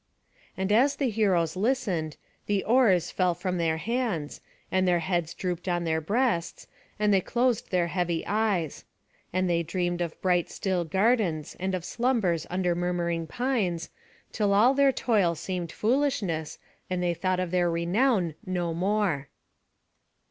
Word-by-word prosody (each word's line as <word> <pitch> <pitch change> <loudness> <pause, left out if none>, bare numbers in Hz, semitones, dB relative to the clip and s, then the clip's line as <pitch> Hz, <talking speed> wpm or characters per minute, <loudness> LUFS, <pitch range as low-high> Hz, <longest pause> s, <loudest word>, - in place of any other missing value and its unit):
And 190 +1 -1
as 265 +7 +4
the 265 -5 0
heroes 185 -7 +1
listened, 190 - -1 0.3
the 200 -2 +1
oars 220 -8 +3
fell 180 -2 +1
from 180 0 -2
their 160 -1 +1
hands, 220 - -2 0.3
and 185 0 +2
their 175 -1 +4
heads 175 -1 -1
drooped 180 -1 -4
on 175 -1 0
their 160 -1 0
breasts, 205 -1 -1 0.3
and 210 -1 +2
they 190 - +4
closed 245 +2 0
their 180 -2 +2
heavy 170 -1 -1
eyes; 200 -7 -1 0.5
and 185 +1 0
they 170 -1 +2
dreamed 175 +1 -2
of 170 -2 -4
bright 180 -2 +1
still 185 -3 -1
gardens, 190 -4 +1
and 190 +1 -1
of 180 -2 -5
slumbers 225 - 0
under 180 -1 0
murmuring 170 -1 -1
pines, 210 - -1 0.4
till 205 -2 +1
all 235 +6 +5
their 280 0 +4
toil 205 -10 +1
seemed 175 +1 -4
foolishness, 210 - 0 0.3
and 180 -1 -1
they 175 -1 +1
thought 185 +1 -1
of 180 -2 -2
their 180 -1 +2
renown 175 +2 +1
no 175 -2 -2
more. 185 -5 0
185 Hz, 150 wpm, -27 LUFS, 170-210 Hz, 0.5 s, all